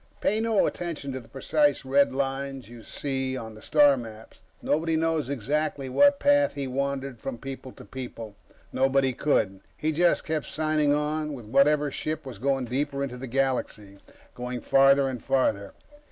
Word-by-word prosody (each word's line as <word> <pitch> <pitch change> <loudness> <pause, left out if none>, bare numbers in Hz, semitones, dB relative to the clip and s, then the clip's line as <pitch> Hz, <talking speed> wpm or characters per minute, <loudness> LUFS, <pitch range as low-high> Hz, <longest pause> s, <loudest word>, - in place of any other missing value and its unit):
Pay 210 +2 +1
no 225 -2 +2
attention 165 -5 -4
to 130 - -4
the 120 - -15
precise 145 +1 +1
red 140 +1 +3
lines 135 -1 -3
you 120 -1 -11
see 130 +1 -3
on 110 -3 -7
the 110 - -13
star 145 +1 +5
maps; 115 -3 -10 0.2
nobody 160 +1 0
knows 160 -3 0
exactly 140 +2 -2
what 285 - +5
path 285 0 +3
he 140 -1 -3
wandered 135 -1 -3
from 130 +1 -5
people 135 0 -8
to - - -13
people. 115 -5 -8 0.4
Nobody 135 0 +2
could. 105 -8 0 0.2
He 155 - 0
just 170 +3 +2
kept 155 -2 -2
signing 155 -1 +1
on 150 +1 -1
with 120 -4 -10
whatever 145 +5 +3
ship 155 +2 -4
was 125 -6 -8
going 135 +1 0
deeper 140 +3 -2
into 125 -2 -5
the 130 +1 -7
galaxy, 120 -6 -2 0.3
going 125 0 -5
farther 135 0 +5
and 125 -3 -5
farther. 100 -7 0
135 Hz, 170 wpm, -26 LUFS, 125-150 Hz, 0.4 s, star